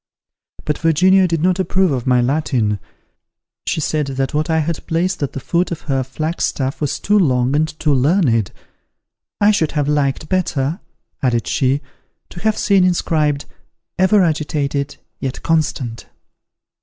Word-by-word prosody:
But 150 - -1
Virginia 185 +4 +4
did 165 -2 -1
not 185 +1 +2
approve 190 -1 +2
of 130 -2 -2
my 125 -1 +4
Latin: 120 -6 0 0.9
she - - 0
said, 150 -1 -1
that 135 +1 -2
what 150 +1 0
I 160 - +2
had 160 +1 -2
placed 175 +2 0
at 140 - -2
the - - -4
foot 175 +6 0
of 170 - -4
her 135 -2 -1
flagstaff 140 0 -2
was 145 - -1
too 210 +1 +2
long 130 -5 +2
and 155 +1 +2
too 150 -2 +2
learned. 130 - +2 0.9
"I 205 +1 +5
should 165 -7 0
have 145 -3 0
liked 145 0 0
better," 160 -3 -1 0.4
added 120 -4 +1
she, 135 +1 +1 0.5
"to - - -9
have 215 +2 0
seen 195 -2 +3
inscribed, 155 -5 +1 0.5
EVER 190 +1 +5
AGITATED, 145 -3 -1 0.2
YET 130 -2 -4
CONSTANT." 135 -8 -1
150 Hz, 150 wpm, -18 LUFS, 135-175 Hz, 0.9 s, I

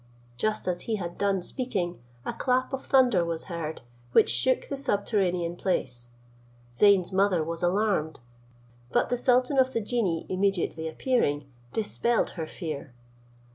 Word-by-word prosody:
Just 215 - -1
as 175 -1 -1
he 220 - +2
had 175 -4 -6
done 195 -2 +1
speaking, 190 - -2 0.2
a - - -2
clap 255 +1 0
of 270 - -3
thunder 245 -9 +4
was 165 -1 -3
heard, 165 -3 -5 0.3
which - - +5
shook 185 - +2
the 280 - -3
subterranean 195 -8 0
place. 125 -10 -2 0.6
Zeyn's 195 +5 +4
mother 190 -3 +2
was 165 +2 -4
alarmed, 180 -3 +1 0.7
but - - +2
the 245 - +1
sultan 255 +2 +3
of 260 0 +3
the - - +1
genii 205 -7 -1
immediately 185 -4 0
appearing, 160 - 0 0.3
dispelled 225 +2 0
her 160 -3 -5
fear. 145 -8 -6
190 Hz, 140 wpm, -27 LUFS, 170-235 Hz, 0.7 s, which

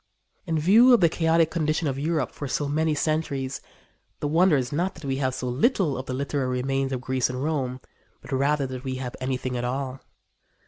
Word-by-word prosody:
In 165 -1 0
view 220 +11 +6
of - - +2
the 170 - +6
chaotic 165 0 +2
condition 155 -1 0
of 135 -1 -2
Europe 155 -3 -1
for 145 - -6
so 145 +2 -1
many 155 +2 +1
centuries, 140 -4 -1 0.6
the 145 - -1
wonder 165 +1 +4
is 125 -2 -2
not 175 +6 -1
that - - -10
we 135 -1 -1
have 130 -2 -1
so 125 - -4
little 150 - +1
of 130 +1 -6
the 130 - -3
literary 140 -1 -1
remains 135 0 -1
of 130 -2 -2
Greece 130 -1 0
and 125 +1 -4
Rome, 135 -5 -1 0.4
but - - -13
rather 140 +2 +1
that 130 -1 -6
we 130 -1 -3
have 130 -1 -5
anything 130 -1 -2
at 120 - -2
all. 130 +1 -3
140 Hz, 210 wpm, -25 LUFS, 130-160 Hz, 0.6 s, view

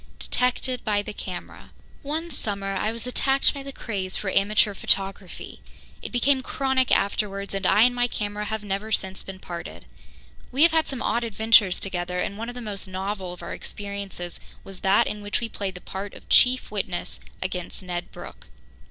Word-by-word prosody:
Detected 250 0 0
by 205 -1 +1
the - - -6
Camera 185 -3 -7 0.3
One 320 +4 -3
summer 200 -6 -2
I 215 - 0
was 230 +1 -3
attacked 270 +2 +3
by 280 - -6
the 275 0 -6
craze 195 -8 -3
for 195 - -2
amateur 210 +1 +3
photography. 195 -1 -1 0.4
It - - -6
became 260 +2 +3
chronic 265 -1 +1
afterwards, 200 -1 +1
and 195 -1 0
I 215 - +6
and 245 +1 +5
my 245 0 +2
camera 210 -2 -3
have 220 0 -3
never 205 +2 -3
since 190 -3 -1
been 190 -1 -8
parted. 170 -2 -7 0.7
We 270 +4 +4
have 335 - +7
had 320 -1 +3
some 265 -2 -3
odd 235 - +1
adventures 220 -3 +5
together, 180 -2 -2
and 190 - -1
one 230 +3 -4
of 245 - -7
the 245 - -5
most 200 -3 -2
novel 190 0 -3
of 180 - -9
our - - -5
experiences 200 -3 -5 0.2
was 195 -1 -7
that 195 +1 +4
in 210 - -4
which 205 0 -1
we 230 - -3
played 195 -3 -4
the 180 - -8
part 195 +1 -6
of - - -13
chief 255 -2 +5
witness 190 -4 -3 0.2
against 185 0 -4
Ned 175 -1 -4
Brooke. - - -10
205 Hz, 185 wpm, -26 LUFS, 190-245 Hz, 0.7 s, have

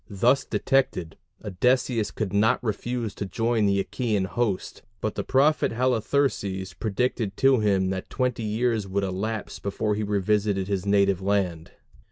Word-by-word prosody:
Thus 120 +7 +2
detected, 90 -11 0 0.3
Odysseus 115 +2 +1
could 105 -4 -4
not 110 +5 +2
refuse 115 0 -2
to 100 - -5
join 115 +2 +1
the 100 0 +2
Achæan 110 -6 -1
host, 105 -1 -2 0.2
but 110 +1 -2
the - - -3
prophet 145 +4 +2
Halitherses 115 -6 0
predicted 110 -1 -2
to 135 -2 +4
him 95 -3 +2
that 95 -1 -5
twenty 125 -2 -1
years 110 -1 0
would 100 +1 -1
elapse 100 +3 -3
before 105 +1 -1
he 105 - -2
revisited 100 -1 0
his 100 -1 -2
native 100 -2 +3
land. 95 -5 -1
105 Hz, 145 wpm, -25 LUFS, 95-120 Hz, 0.3 s, to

